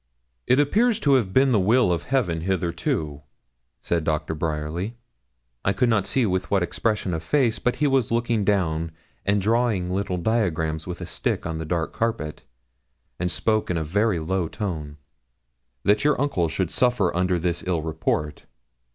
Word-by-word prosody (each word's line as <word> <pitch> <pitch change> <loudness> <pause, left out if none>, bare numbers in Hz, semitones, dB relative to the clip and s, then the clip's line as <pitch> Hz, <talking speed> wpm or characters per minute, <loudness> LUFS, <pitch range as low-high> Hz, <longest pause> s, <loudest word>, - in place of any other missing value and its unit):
'It 125 - +4
appears 220 - +3
to 145 -8 +3
have 115 -8 +2
been 130 +5 +4
the 110 - +4
will 105 0 +3
of 85 - -3
Heaven 105 -12 0
hitherto,' 85 -5 -2 0.6
said 85 -2 0
Doctor 80 0 -1
Bryerly 80 +7 -3 0.7
I 95 - +2
could 120 +5 +2
not 105 -4 +2
see 130 +4 +2
with 95 -3 -1
what 95 -3 +2
expression 105 0 -1
of 80 - -2
face, 115 - +1
but 125 - 0
he 150 - 0
was 135 -5 +2
looking 115 -2 +1
down, 85 -5 0 0.3
and 100 +1 +3
drawing 110 -3 +1
little 95 -1 -1
diagrams 85 -6 0
with 90 -1 -4
his 90 -2 -7
stick - - -1
on 80 -1 -3
the 80 - -4
dark 80 0 -2
carpet, 115 -10 -2 0.8
and 90 0 0
spoke 110 +3 0
in 90 - 0
a 80 - -1
very 100 +5 +1
low 85 +2 -1
tone 80 -7 -5 0.9
'that 105 +1 +3
your 150 0 +3
uncle 130 - +1
should 85 +1 -2
suffer 120 -9 +2
under 90 0 +1
this 85 0 -1
ill 85 -4 0
report. 80 -1 -2
95 Hz, 170 wpm, -24 LUFS, 80-115 Hz, 0.9 s, It